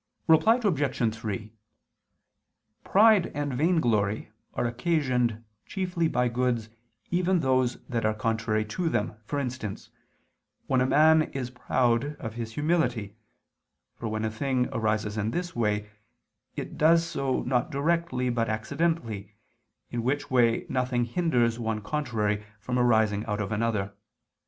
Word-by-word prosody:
Reply 165 +9 +5
Obj. 135 - +1
3: 110 -1 -5 1.3
Pride 210 -2 +5
and 145 -2 -2
vainglory 120 - +1 0.2
are - - 0
occasioned 125 -3 0 0.2
chiefly 180 -3 -1
by 125 -5 +1
goods 120 -2 -1 0.4
even 180 +1 +2
those 130 -3 +1
that 120 -2 -2
are 110 0 +1
contrary 110 0 0
to 165 +11 -2
them, 115 -6 -1
for 145 - -3
instance, 125 -7 -4 0.7
when 130 -1 +2
a 130 - +2
man 155 +3 +5
is 125 -2 -4
proud 125 +2 0
of 110 -6 -6
his 115 -1 -5
humility: 125 -9 0 0.8
for 115 - -5
when 110 0 -2
a 110 - -1
thing 125 +2 0
arises 110 -2 -1
in 105 +1 0
this 175 +6 -3
way, 105 -2 -1 0.6
it - - -6
does 165 +2 +5
so 135 -5 -1
not 125 +1 0
directly 150 -3 0
but 115 -1 0
accidentally, 110 - -2 0.6
in 120 - -2
which 135 +4 -1
way 120 -3 +3
nothing 125 -2 0
hinders 120 -5 +1
one 110 -2 -1
contrary 105 -5 -1 0.2
from 125 +4 -2
arising 110 -4 +3
out 105 -1 -2
of 105 0 -3
another. 105 -2 -1
120 Hz, 135 wpm, -27 LUFS, 110-145 Hz, 1.3 s, Reply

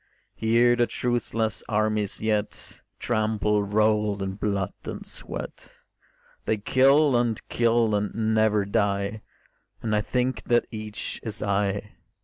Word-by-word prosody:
Here 120 +2 +3
the 120 -1 +2
truceless 115 -2 -1
armies 105 -1 0
yet 105 -1 -2 0.2
Trample, 110 -2 +1
rolled 105 0 +1
in 95 0 -3
blood 100 -1 -2
and - - -6
sweat; - - -7 0.7
They 110 - +1
kill 135 +6 +4
and 120 -2 +1
kill 115 -2 +2
and 110 +2 0
never 110 -2 +3
die; 100 0 0 0.6
And 110 -2 0
I 105 - +2
think 125 +3 -1
that 120 0 +3
each 110 -1 -6
is 110 -2 -4
I. 100 0 -1
110 Hz, 125 wpm, -25 LUFS, 105-115 Hz, 0.7 s, kill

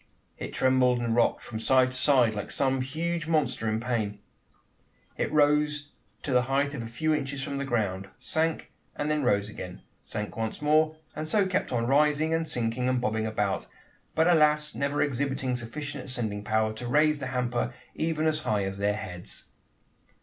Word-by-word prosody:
It - - -5
trembled 130 -1 +3
and 120 -1 0
rocked 120 - +2
from 110 -2 -6
side 130 +2 +4
to - - -8
side, 130 -4 +4
like 105 -1 -4
some 135 -1 +1
huge 160 +5 -2
monster 130 -8 +1
in 110 +1 0
pain. 115 -4 -1 1.0
It - - -1
rose 150 0 +2 0.3
to 140 - -2
the 125 - +5
height 140 +1 +1
of 135 - -4
a 115 - -5
few 155 +7 0
inches 135 -2 -2
from 140 -1 -3
the 140 - -2
ground, 100 -6 -1
sank, 160 +6 -1 0.2
and 150 +1 -1
then 150 -1 +1
rose 100 -6 +2
again, 90 -4 -8 0.2
sank 105 -1 -5
once 110 -1 -3
more, 155 +1 +3 0.2
and 155 0 -3
so 200 +5 +3
kept 185 0 -1
on 120 -2 0
rising 150 +4 +3
and 165 0 0
sinking 120 +1 0
and 130 -1 +2
bobbing 110 -2 0
about, 105 -3 -1 0.5
but 160 - +4
alas! 150 -3 +4
never 140 +1 0
exhibiting 135 -2 -1
sufficient 140 +4 -5
ascending 110 -5 -3
power, 110 0 +1
to 120 +3 -6
raise 150 +3 +3
the 130 - -3
hamper 125 -2 -1 0.2
even 160 -1 -1
as 155 -1 +2
high 105 -9 0
as 95 0 -4
their 105 0 +1
heads! 90 -4 -6
130 Hz, 180 wpm, -28 LUFS, 115-150 Hz, 1.0 s, the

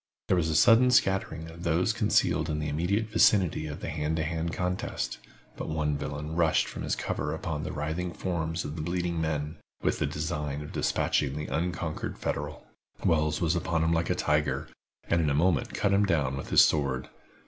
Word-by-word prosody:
There 90 - +4
was 80 -2 +1
a 80 - 0
sudden 115 +8 +6
scattering 95 -9 +1
of 85 +1 -11
those 90 +5 +1
concealed 105 -7 +2
in 75 - -1
the 75 0 -2
immediate 95 +9 0
vicinity 95 -7 +3
of 75 0 -7
the - - -4
hand 75 +1 -1
to 80 - 0
hand 80 +1 -2
contest, 90 0 -3 0.4
but - - -5
one 75 -1 0
villain 75 +1 -4
rushed 85 -2 +3
from - - -7
his - - -1
cover 75 +1 -2
upon 80 -2 -3
the - - -4
writhing 80 +4 -3
forms 80 -2 -2
of 75 - -5
the 80 - -4
bleeding 85 0 -1
men, 75 0 -2 0.3
with - - +1
the - - +1
design 75 -1 -3
of 75 - -9
dispatching 70 -1 0
the 75 0 -3
unconquered 80 -1 -3
Federal. - - -4 0.4
Wells 75 -1 +2
was 85 +1 +2
upon 85 -2 0
him 80 +1 +2
like 85 0 0
a - - +2
tiger, 75 -1 0 0.4
and 85 - +2
in 75 - +1
a 70 - +1
moment 80 -1 +1
cut 100 -1 +1
him 100 +1 +3
down 75 -7 +1
with 70 - -6
his - - +7
sword. 70 -4 0
80 Hz, 200 wpm, -28 LUFS, 75-90 Hz, 0.4 s, his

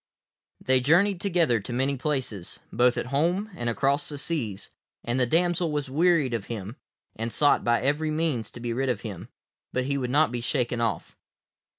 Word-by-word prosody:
They 130 0 +3
journeyed 175 +8 +3
together 170 - +2
to 105 +5 -8
many 135 +3 0
places, 130 - -3
both 125 +1 +3
at - - -1
home 175 +9 +1
and 120 -7 -2
across 140 +4 +1
the 145 - -4
seas, 125 - -3 0.3
and 120 +2 -1
the 125 - +2
damsel 175 +3 +1
was 145 -3 -3
wearied 160 -4 +3
of 110 -4 -2
him, 110 +1 -6 0.4
and 115 +1 -3
sought 145 +3 +3
by 120 0 +2
every 150 +3 +1
means 155 -8 -1
to - - -8
be 120 0 -3
rid 135 +2 -1
of 120 -5 -1
him, 100 -1 -7 0.4
but 130 0 -1
he 140 +1 -1
would 125 -2 -2
not 145 0 +3
be 120 -1 -3
shaken 120 -1 -1
off. 110 -6 -2
130 Hz, 190 wpm, -26 LUFS, 120-155 Hz, 0.4 s, They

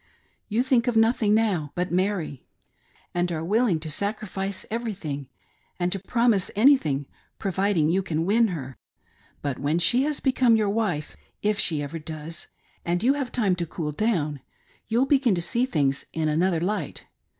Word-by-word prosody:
You 225 +4 +1
think 255 -2 +2
of 245 - +1
nothing 225 -2 +3
now 190 -10 0
but 180 0 -2
Mary, 180 -7 -1 0.7
and 175 0 0
are 160 -1 -3
willing 210 -2 +2
to 155 -1 -4
sacrifice 200 +1 -3
everything, 185 - -4 0.5
and 175 0 0
to 195 - -2
promise 230 -5 +2
anything, 205 - +4 0.3
providing 190 -4 +1
you^ 185 +4 +1
can 165 -3 -1
win 225 +4 +4
her. 135 - -6 0.6
But 140 -3 -2
when 145 +4 +1
she 240 +9 +4
haa 300 +1 0
become 255 -3 +4
your 210 -2 +1
wife, 195 -9 -1 0.3
if 210 0 +1
she 155 -7 +2
ever 155 +4 -5
does, 155 +1 -7 0.4
and 175 +3 -1
you 260 +3 +5
have 280 -3 -3
time 205 -7 +2
to 170 -1 -2
cool 155 -1 -4
down, 150 -5 0 0.5
you'll 235 +4 +2
begin 270 -7 +3
to - - -1
see 235 +9 0
things 140 - 0
in 160 -1 0
another' 165 +3 +2
light. 205 +5 -3
190 Hz, 165 wpm, -25 LUFS, 160-225 Hz, 0.7 s, you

